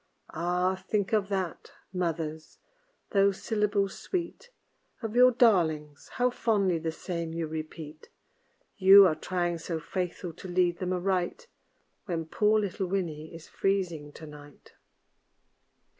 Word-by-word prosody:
Ah! 180 +3 0
think 205 -1 0
of 205 -2 +2
that, 190 -4 -3 0.2
mothers! 160 -3 -3 0.5
those 200 -1 +3
syllables 210 -2 0
sweet 375 +6 -4 0.5
Of 225 0 -4
your 250 +1 +8
darlings, 165 - +2
how 250 0 +1
fondly 200 -8 +1
the 160 0 -2
same 170 -1 -5
you 165 0 -2
repeat! 155 0 -7 0.7
You 195 +1 +9
are 170 - +4
trying 175 +1 -2
so 165 0 -4
faithful 175 +1 -4
to 185 - -10
lead 175 -1 +1
them 185 -1 -2
aright 185 - -1 0.6
When 165 -4 -3
poor 210 +6 +2
little 195 -2 -2
Winnie 165 -5 -3
is 165 -1 -11
freezing 175 -7 -1
to 160 - -10
night. 145 -1 -14
180 Hz, 130 wpm, -28 LUFS, 160-200 Hz, 0.7 s, You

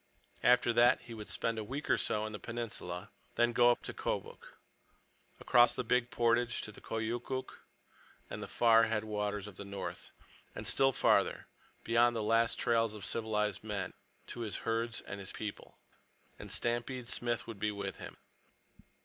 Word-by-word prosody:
After 125 -1 +5
that 120 +2 +5
he 115 0 -10
would 105 -2 -8
spend 115 -1 -1
a - - -3
week 135 +7 -5
or - - +4
so 105 0 0
in 110 - -5
the 105 - -5
Peninsula, 105 -5 -5 0.2
then 120 0 +3
go 120 +1 +6
up 120 - +1
the - - -5
Kobuk, - - -4 0.8
across 120 0 +5
the 125 - -1
big 125 +1 +2
portage 120 0 +1
to 110 - -5
the - - -14
Koyukuk 120 +4 -3 0.7
and - - -6
the - - -5
far 115 -1 +5
headwaters 105 -2 -2
of 105 -3 -10
the - - -6
north, 100 0 -6 0.4
and - - -6
still 135 0 +3
farther—beyond 120 -1 +1
the 110 - -1
last 115 +2 +3
trails 115 -2 +2
of 100 -3 -7
civilized 105 -3 -1
men—to 105 +2 -7
his 110 -3 -3
herds 115 0 -1
and 100 - -7
his 95 - -4
people. 105 -2 -7 0.6
And - - -8
Stampede 120 +1 -2
Smith 120 -1 -1
would 115 -3 -8
be 105 - +1
with 100 -1 -5
him. - - -9
115 Hz, 165 wpm, -33 LUFS, 105-120 Hz, 0.8 s, go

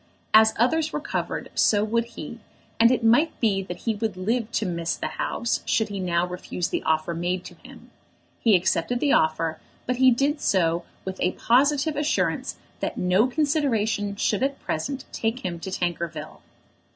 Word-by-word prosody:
As 220 0 +6
others 310 +7 +1
recovered 295 - -3
so 205 -1 +3
would 230 +2 0
he, 235 - -9 0.4
and 230 +1 +7
it 250 -1 +1
might 245 +9 +3
be 200 -4 +2
that 180 -2 -8
he 225 - 0
would 210 -3 -3
live 225 +4 -1
to 220 - 0
"miss 170 -2 -2
the - - -5
House," 235 - -2
should 220 -1 +1
he 200 -1 -4
now 175 -1 +1
refuse 180 0 -4
the - - -1
offer 160 +1 0
made 175 +2 -2
to - - -9
him. - - -14 0.5
He 225 -4 +4
accepted 180 +6 +1
the 285 - +2
offer, 160 0 +1 0.3
but 250 0 -1
he 260 0 +6
did 280 +5 +1
so 170 -2 +1 0.2
with 190 0 -5
a 180 - +1
positive 285 +5 +2
assurance 295 +1 0 0.2
that - - -3
no 185 +6 +3
consideration 245 -8 0
should 205 0 0
at 275 +1 0
present 265 - -3
take 225 0 -2
him 170 -2 -3
to 190 - -6
Tankerville. 175 -3 -4
215 Hz, 175 wpm, -25 LUFS, 180-250 Hz, 0.5 s, and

